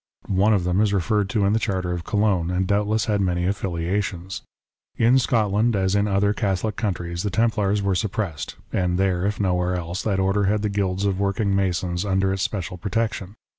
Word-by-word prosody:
One 100 +3 +2
of 100 -4 +2
them 90 +3 +1
is 105 -2 +2
referred 100 +1 +1
to 105 -1 +1
in 100 - +2
the 110 - +2
Charter 95 -5 -1
of 85 -1 -3
Cologne, 100 -5 +1
and 90 +1 0
doubtless 105 +3 +1
had 105 -3 +1
many 90 -2 0
affiliations. 95 0 -2 0.6
In 120 +3 +5
Scotland, 110 -2 +1
as 95 -1 +1
in 100 0 +2
other 100 +1 +2
Catholic 100 0 -1
countries, 85 -5 -3
the 105 - -1
Templars 105 -1 +1
were 100 -1 +1
suppressed; 95 -4 -3 0.2
and 90 -1 +1
there, 95 -1 +1
if 105 - -2
nowhere 90 -2 +1
else, 90 +1 -3
that 100 -3 0
Order 95 +1 +2
had 105 +2 +1
the 105 - +1
guilds 100 -1 -1
of 100 -1 0
working 100 0 0
masons 90 -2 0
under 95 -1 +1
its 95 - -3
special 95 -2 -3
protection. 105 0 -2
100 Hz, 195 wpm, -23 LUFS, 90-105 Hz, 0.6 s, In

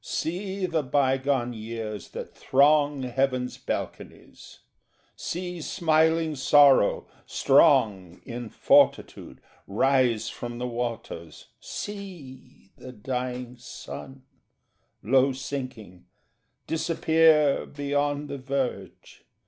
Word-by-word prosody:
See 190 +3 -3
the 165 -3 0
bygone 135 -2 0
years 110 -2 -6
that - - -8
throng 145 0 +3
Heaven's 130 0 -1
balconies; - - -7 0.5
see 180 -1 -5
smiling 160 0 +1
Sorrow, 140 -3 +5 0.2
strong 115 - +3
In 120 -1 -6
fortitude, - - +2 0.3
rise 125 +1 +2
from 120 0 -6
the 125 - -4
waters; 115 -8 -6
see 175 - -9
The 130 - -10
dying 125 +1 -5
sun, 135 +2 -10 0.8
low 130 +4 +3
sinking, 130 -9 -7 0.6
disappear 160 -2 +3
Beyond 145 0 -2
the 140 - -6
verge. 135 -1 -5
135 Hz, 85 wpm, -26 LUFS, 120-150 Hz, 0.8 s, Sorrow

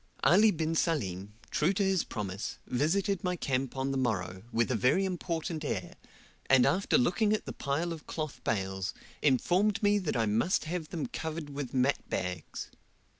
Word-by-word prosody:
Ali 190 - +6
bin 160 -3 0
Salim, 105 - -1 0.2
true 165 +6 +2
to 200 +1 +1
his 190 -2 +2
promise, 100 -3 -4
visited 175 - +1
my 180 -1 0
camp 135 -4 -2
on 135 +1 0
the 135 - 0
morrow, 95 -7 -1
with 115 +1 +1
a - - +2
very 130 - +3
important 165 -3 -3
air, 95 - -3 0.5
and 130 -2 +6
after 180 +9 +3
looking 205 - +2
at 215 - -1
the - - -5
pile 160 +5 -1
of 160 -2 -10
cloth 155 -3 -5
bales, 95 -2 -1 0.3
informed 185 - +2
me 205 0 +4
that 175 -9 -1
I 115 - +2
must 115 - +1
have 160 -1 -3
them 165 - -3
covered 160 -9 -5
with 140 -3 -5
mat 130 +2 +1
bags. 90 -1 -4
150 Hz, 175 wpm, -30 LUFS, 120-175 Hz, 0.5 s, Ali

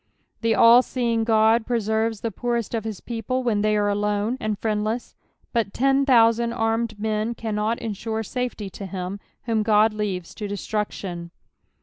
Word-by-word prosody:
The 225 -1 +2
all 235 +2 +8
leeJDK 225 -3 +2
Ood 230 - -8
preserves 220 -2 0
the 230 - -2
poorest 235 +2 -2
of 225 -2 -2
his 215 -4 -5
people 240 +2 -3
when 220 -4 +1
they 215 0 +2
are 205 0 +2
olnne 210 +3 0
and 215 -1 -2
friend 210 -1 -1
len, 220 +3 0 0.5
but 225 -4 -1
ten 270 +2 +2
thousand 235 -2 +4
armed 225 -1 -1
men 220 +2 -1
cannot 220 0 -1
ensure 220 0 -4
safety 230 -3 -4
to 195 - -7
him 185 +1 -5 0.2
whom 225 -2 0
God 215 0 +4
lenves 195 -5 -3
to 210 - -4
destruction. 200 -4 -4
220 Hz, 160 wpm, -24 LUFS, 210-230 Hz, 0.5 s, all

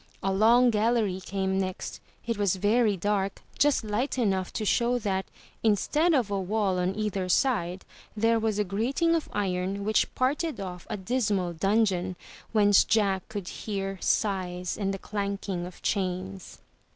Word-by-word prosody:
A 195 0 +1
long 235 +5 +5
gallery 215 -3 +1
came 190 0 -1
next; 185 -1 -4 0.3
it 230 0 -1
was 200 -3 +1
very 210 +2 +2
dark, 200 +1 -1 0.2
just 290 -4 +3
light 220 +6 -1
enough 190 -6 0
to 215 - -2
show 240 +4 +2
that, 195 -5 -2 0.3
instead 295 - +2
of 235 -7 +1
a 200 - 0
wall 195 -1 0
on 180 +2 0
either 200 -3 -2
side, 185 -5 +1 0.3
there 225 +1 +3
was 220 -2 0
a 210 - +2
grating 245 - 0
of 330 -2 -1
iron 195 0 -2
which 215 +1 +2
parted 290 +5 0
off 180 -3 -7
a - - -2
dismal 195 -4 0
dungeon, 190 0 +1 0.4
whence 205 -3 +5
Jack 195 -4 +1
could 205 -4 -5
hear 195 -2 -4
sighs 180 -4 0
and 195 -2 -1
the 195 - -3
clanking 200 -3 -3
of 180 - -13
chains. 190 -1 -3
200 Hz, 155 wpm, -27 LUFS, 190-225 Hz, 0.4 s, long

